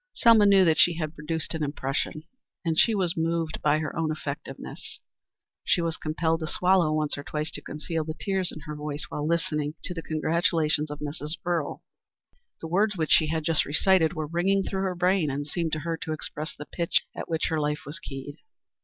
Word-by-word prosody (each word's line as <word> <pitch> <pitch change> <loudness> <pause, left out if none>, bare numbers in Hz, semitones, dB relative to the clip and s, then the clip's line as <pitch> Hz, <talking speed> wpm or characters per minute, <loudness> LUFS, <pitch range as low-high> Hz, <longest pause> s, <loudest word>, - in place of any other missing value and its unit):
Selma 225 -3 +6
knew 195 -2 +7
that 160 -2 +3
she 175 - +6
had 155 -2 -3
produced 160 +1 -3
an 160 -1 -2
impression 145 +1 -2 0.4
and 160 -1 +2
she 225 - +5
was 180 -3 +1
moved 165 -1 -1
by 150 0 +3
her 155 -1 -3
own 160 -1 0
effectiveness. 150 -2 -6 0.6
She - - +2
was 165 -1 0
compelled 160 +1 0
to 160 - -3
swallow 180 -2 +3
once 155 -2 0
or - - -6
twice 150 +1 -3
to - - -7
conceal 155 +2 -3
the 155 0 -5
tears 190 -3 0
in 155 - -9
her 150 -1 -6
voice 150 0 -4
while 150 0 -3
listening 150 -2 0
to 180 - -4
the 165 - -5
congratulations 155 -1 +1
of 150 0 -7
Mrs. 150 +1 -4
Earle. 170 -4 -1 0.8
The 160 - -4
words 200 +4 +2
which 155 -2 -1
she 155 - +6
had 160 0 -1
just 160 -1 +2
recited 160 +2 +3
were 155 -3 -2
ringing 185 +5 +1
through 190 0 -2
her 190 -2 -1
brain 180 -2 +2
and 140 +1 -2
seemed 160 +2 -2
to 155 - 0
her 165 0 -2
to 160 - -4
express 155 0 -5
the 150 - -7
pitch 170 +1 0
at - - -6
which 160 -1 0
her 160 -2 0
life 150 +2 -1
was 150 +3 -7
keyed. 140 0 -7
160 Hz, 205 wpm, -27 LUFS, 150-170 Hz, 0.8 s, knew